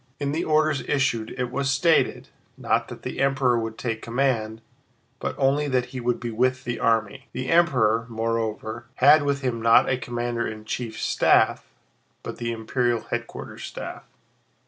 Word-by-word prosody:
In 140 -1 -1
the 160 +4 -1
orders 155 -2 +2
issued 120 -6 +1
it 125 -1 -2
was 135 +1 -1
stated, 160 +5 +2 0.3
not - - 0
that - - -10
the - - -5
Emperor 135 -3 +2
would 115 -1 -5
take 115 -3 -3
command, 115 -3 -1 0.6
but - - -3
only 140 +2 +2
that 125 -2 0
he 130 - -4
would 120 0 -1
be 120 -1 -4
with 130 +3 +1
the 120 -1 -3
army. 125 +3 0
The 130 0 -4
Emperor, 125 -10 +3
moreover, 115 0 -3
had 150 +2 +6
with 140 -1 -1
him 125 -4 -2
not 115 +3 +5
a 130 - 0
commander 120 0 -2
in 110 0 -8
chief's 110 0 -4
staff - - +3 0.6
but - - -6
the 120 -1 -3
imperial 115 +1 0
headquarters - - -5
staff. - - -7
125 Hz, 165 wpm, -24 LUFS, 115-135 Hz, 0.6 s, had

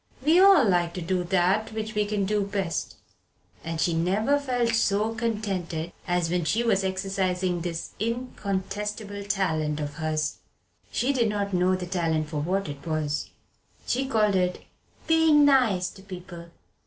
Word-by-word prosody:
We 325 +4 +6
all 380 - +7
like 175 -2 +1
to 180 - -4
do 180 +1 0
that 190 +5 +1
which 215 0 -4
we 210 -1 0
can 205 -2 0
do 210 +1 +1
best. 195 -4 -3 0.7
And 165 0 -4
she 170 - +2
never 200 +12 +2
felt 250 -4 0
so 215 0 +1
contented 195 -8 -3 0.2
as 175 -1 +1
when 180 -1 +1
she 215 +10 +1
was 200 -5 +2
exercising 185 -2 -1
this 165 -1 -4
incontestable 210 -2 -3
talent 160 -7 0
of 145 0 -5
hers. 155 -1 -1 0.5
She 270 +3 +1
did 235 -4 +2
not 200 -1 -2
know 180 +1 +3
the 185 -1 -4
talent 165 -4 -1
for 150 -2 -3
what 190 +5 -1
it 140 -1 -7
was. 155 -2 -2 0.6
She 265 +2 0
called 215 -5 +2
it 180 -1 0 0.4
"being 320 -2 +5
nice 235 -10 +3
to 195 - -14
people." 180 -3 -9
190 Hz, 155 wpm, -26 LUFS, 175-220 Hz, 0.7 s, all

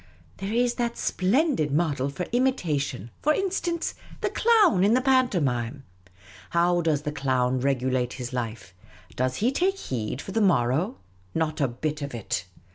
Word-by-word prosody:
There 195 +1 -4
is 240 +1 +2
that 235 0 -1
splendid 200 - +1
model 145 -3 +1
for 175 +6 -4
imitation, 155 - 0
for 305 - +3
in 390 -1 0
stance, 345 -3 -1 0.3
the - - 0
Clown 420 - +4
in 210 +4 +5
the 255 - +3
pantomime. 150 - +1 0.7
How 175 +1 +2
does 155 -3 +1
Clown 130 -3 +1
regulate 130 -2 0
his 125 -1 -6
life? 115 -6 -4 0.4
Does 130 0 0
he 235 - +1
take 380 +7 +1
heed 125 - -4
for 195 - -7
the 225 - +1
morrow? 135 - +2 0.4
Not 155 -1 -1
a 140 - +3
bit 150 +5 -3
of 140 -3 -4
it 95 -4 -3
155 Hz, 155 wpm, -26 LUFS, -, 0.7 s, in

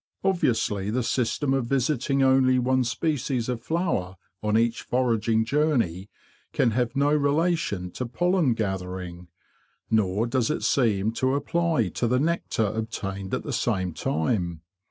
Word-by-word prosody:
Obviously 115 - +1
the 125 +3 0
system 130 +4 0
of 135 -3 0
visiting 135 +1 +1
only 130 -1 +4
one 130 +1 +2
species 125 -1 -1
of 125 -2 -3
flower 160 - -1 0.3
on 105 0 +1
each 115 0 +1
foraging 115 -3 +1
journey 120 - 0 0.4
can 115 - +2
have 120 +2 -1
no 140 +2 +2
relation 145 - 0
to 125 - -4
pollen 175 -1 +1
gathering; 90 -4 -4 0.6
nor 105 0 +2
does 120 -1 0
it 155 - -2
seem 110 -5 +2
to 130 +3 0
apply 160 - 0
to 120 - -1
the 125 +2 +2
nectar 160 -7 0
obtained 100 -3 -4
at - - -4
the 145 - -4
same 95 -8 -1
time. 85 0 -1
120 Hz, 140 wpm, -25 LUFS, 105-140 Hz, 0.6 s, only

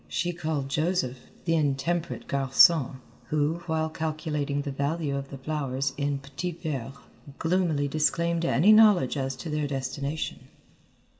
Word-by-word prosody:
She 175 0 -1
called 155 -5 -2
Joseph, 140 -3 0 0.3
the 165 - +2
intemperate 155 +3 -1
garçon, 135 +1 +4 0.3
who, 150 +5 0
while 160 -1 0
calculating 155 -3 -2
the 140 - -4
value 140 +1 -1
of 135 0 -4
the 135 - -7
flowers 135 -2 -2
in 140 0 -1
petits 160 +6 -6
verres, 135 -4 -3 0.4
gloomily 165 -4 +1
disclaimed 170 +3 +1
any 170 +5 +4
knowledge 210 - +6
as 135 -1 -2
to 160 +6 -7
their 150 -1 -1
destination. 140 +2 -4
150 Hz, 135 wpm, -27 LUFS, 140-165 Hz, 0.4 s, knowledge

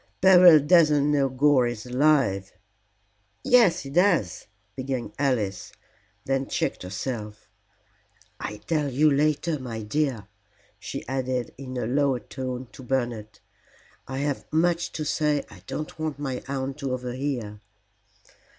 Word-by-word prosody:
"Beryl 180 -4 +8
doesn't 150 -2 +4
know 140 -2 +2
Gore 130 -1 +3
is 120 -1 -5
alive." 125 -7 +2 0.9
"Yes, 235 -8 +4
he 135 - -8
does," 170 - +1 0.3
began 130 -5 -4
Alice, 115 -9 -1 0.5
then 135 0 -1
checked 170 -1 -2
herself. 105 +3 -6 0.9
"I'll 105 - -5
tell 150 +3 -1
you 150 +4 +3
later, 150 +2 +1
my 115 -4 -6
dear," 120 -2 -1 0.5
she - - -7
added 130 -1 -2
in 130 -1 -7
a 125 - -2
lower 135 +1 +1
tone 130 0 -6
to - - -12
Bernard. 120 -5 -3 0.7
"I 130 - -5
have 145 0 -3
much 170 +2 +1
to 155 - -4
say 150 -1 0
I 95 - -14
don't 155 +1 -6
want 155 -3 -3
my 135 -3 -4
aunt 135 +1 -4
to 135 -3 -2
overhear." 125 -4 -4
135 Hz, 130 wpm, -25 LUFS, 125-150 Hz, 0.9 s, Beryl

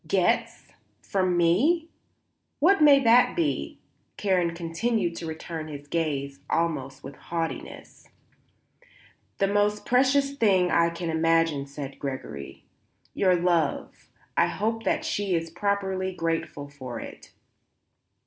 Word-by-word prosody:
"Gets? - - 0 0.3
From 185 -2 0
me? 275 - +2 0.7
What 345 +4 +4
may 290 -2 +8
that 240 0 +5
be?" 335 -3 -1 0.4
Karen 180 -4 +1
continued 175 +2 -1
to 165 - -5
return 160 0 -6
his 145 -1 -9
gaze 140 -4 -2
almost 140 -5 -1
with 135 - -9
haughtiness. 165 -1 -6 1.3
"The 195 - +2
most 205 +1 +1
precious 275 +2 +3
thing 195 -8 +3
I 170 0 +4
can 170 0 -4
imagine," 165 -3 +2
said 140 -1 -8
Gregory. 130 - -6 0.5
"Your 185 -2 +3
love. 170 -4 -1 0.3
I - - +4
hope 225 +2 -2
that - - 0
she 200 -3 -1
is 165 0 -3
properly 190 0 -1
grateful 165 -4 -3
for 130 -4 -8
it." - - -11
170 Hz, 120 wpm, -26 LUFS, 160-205 Hz, 1.3 s, may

